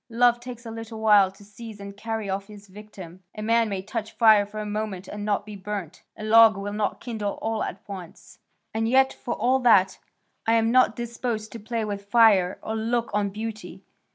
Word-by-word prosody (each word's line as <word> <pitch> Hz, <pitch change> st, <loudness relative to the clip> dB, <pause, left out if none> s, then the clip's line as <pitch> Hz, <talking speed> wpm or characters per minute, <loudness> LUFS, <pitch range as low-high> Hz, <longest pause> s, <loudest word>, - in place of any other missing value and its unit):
Love 240 Hz, +1 st, +3 dB
takes 240 Hz, -1 st, -9 dB
a 225 Hz, -, -6 dB
little 225 Hz, 0 st, -8 dB
while 210 Hz, -3 st, +5 dB
to 195 Hz, +1 st, -18 dB
seize 210 Hz, +1 st, -11 dB
and 200 Hz, 0 st, -9 dB
carry 220 Hz, 0 st, -4 dB
off 195 Hz, +1 st, -3 dB
his 205 Hz, -1 st, -13 dB
victim. 190 Hz, -3 st, -12 dB
A 215 Hz, -, -6 dB
man 230 Hz, 0 st, +2 dB
may 195 Hz, -2 st, -3 dB
touch 220 Hz, +2 st, -5 dB
fire 215 Hz, -3 st, +5 dB
for 215 Hz, -, -10 dB
a 210 Hz, -, -4 dB
moment 210 Hz, -3 st, -4 dB
and 210 Hz, 0 st, -6 dB
not 205 Hz, -1 st, -1 dB
be 210 Hz, -1 st, -9 dB
burnt; 195 Hz, -4 st, -6 dB, 0.2 s
a 215 Hz, -, -8 dB
log 220 Hz, -1 st, +6 dB
will 200 Hz, +1 st, -5 dB
not 210 Hz, -1 st, -2 dB
kindle 215 Hz, -4 st, -4 dB
all 225 Hz, -1 st, -3 dB
at 195 Hz, -, -5 dB
once; 185 Hz, -4 st, -10 dB, 0.3 s
and 225 Hz, +1 st, 0 dB
yet 265 Hz, +1 st, +4 dB
for 240 Hz, -, -5 dB
all 260 Hz, +2 st, +2 dB
that, 200 Hz, -7 st, +4 dB, 0.5 s
I 225 Hz, -, +4 dB
am 225 Hz, 0 st, +2 dB
not 255 Hz, -3 st, +4 dB
disposed 235 Hz, -2 st, -4 dB
to 230 Hz, -, -8 dB
play 225 Hz, +1 st, -3 dB
with 200 Hz, -1 st, -5 dB
fire 205 Hz, -6 st, +5 dB
or 220 Hz, -, -3 dB
look 230 Hz, +1 st, -1 dB
on 205 Hz, -1 st, +1 dB
beauty. 215 Hz, +2 st, -7 dB
215 Hz, 210 wpm, -25 LUFS, 200-230 Hz, 0.5 s, log